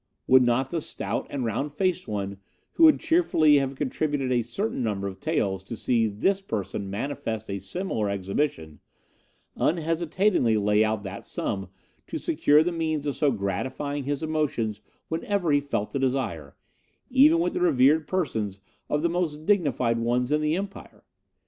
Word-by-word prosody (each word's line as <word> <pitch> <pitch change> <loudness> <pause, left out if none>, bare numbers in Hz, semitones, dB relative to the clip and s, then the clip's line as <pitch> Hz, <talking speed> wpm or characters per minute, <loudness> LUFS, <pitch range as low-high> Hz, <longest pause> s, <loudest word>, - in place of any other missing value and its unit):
Would 130 0 +6
not 125 +2 +1
the 165 - -1
stout - - -3
and 135 -4 -3
round 120 +6 -2
faced 185 +4 -1
one, 100 -2 -3 0.3
who 330 - +5
would 310 - +6
cheerfully 160 - +4
have 135 -1 -1
contributed 145 -1 -1
a 120 -1 +3
certain 160 - -3
number 100 -4 -1
of 95 -1 -7
taels 100 - -1
to 115 - -6
see 115 -2 +1
this 190 - 0
person 100 - -4
manifest 110 -1 -4
a 100 - -3
similar 110 - -2
exhibition, 95 - -2 0.8
unhesitatingly 165 - +1
lay 105 +1 +3
out 110 -1 -1
that 95 0 -7
sum 95 -1 -3 0.4
to - - -4
secure 150 +2 +3
the 175 - -1
means 160 -3 -2
of 145 - -1
so 150 - +2
gratifying 130 +7 -3
his 145 +2 -2
emotions 135 -9 -1 0.3
whenever 175 +1 -1
he 145 - +4
felt 140 -7 -3
the 140 - -2
desire, 125 - -2 0.6
even 290 +6 +6
with 345 +1 0
the - - -2
revered 150 -1 +4
persons 110 - -2 0.3
of 150 +1 0
the - - +4
most 165 -3 -2
dignified 135 - +2
ones 120 +3 0
in 150 0 +2
the 155 +1 +1
Empire? 195 +1 -7
135 Hz, 160 wpm, -26 LUFS, 110-160 Hz, 0.8 s, Would